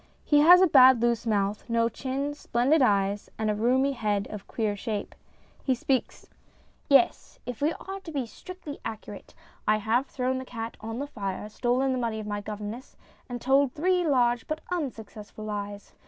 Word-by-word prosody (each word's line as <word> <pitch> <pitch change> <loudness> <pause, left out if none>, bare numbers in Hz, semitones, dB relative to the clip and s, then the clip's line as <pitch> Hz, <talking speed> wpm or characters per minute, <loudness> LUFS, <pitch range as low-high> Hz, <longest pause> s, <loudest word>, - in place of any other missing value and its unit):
He 295 - +4
has 350 +5 +8
a - - +6
bad 260 -4 +7
loose 235 -1 0
mouth, 205 +1 -1
no 230 0 +2
chin, 270 +4 -3
splendid 280 +2 +1
eyes, 200 -3 +1
and 220 -1 0
a - - -1
roomy 255 +5 +2
head 210 -6 -1
of 210 -2 -8
queer 215 -3 -1
shape. 210 0 -4 0.5
He 260 - +2
speaks: 260 +1 -2 0.6
YES, 290 +5 +3
if 245 -1 -6
we 300 +2 +3
are 390 +1 -7
to 365 -4 -10
be 275 -5 -2
strictly 315 - -9
accurate, 215 -2 -8 0.3
I 215 0 +4
have 230 +6 0
thrown 260 0 -1
the - - -5
cat 230 -2 -6
on 225 +1 -5
the 280 - -2
fire, 205 -7 -5
stolen 250 +4 0
the 255 - -1
money 230 -2 -2
of 215 - -6
my 205 0 -3
governess, 210 +4 -7 0.3
and 245 0 -4
told 270 +1 +3
three 360 +3 +1
large 245 -6 +2
but 310 0 -3
unsuccessful 220 - -5
lies. 205 -1 -6
240 Hz, 180 wpm, -27 LUFS, 215-275 Hz, 0.6 s, has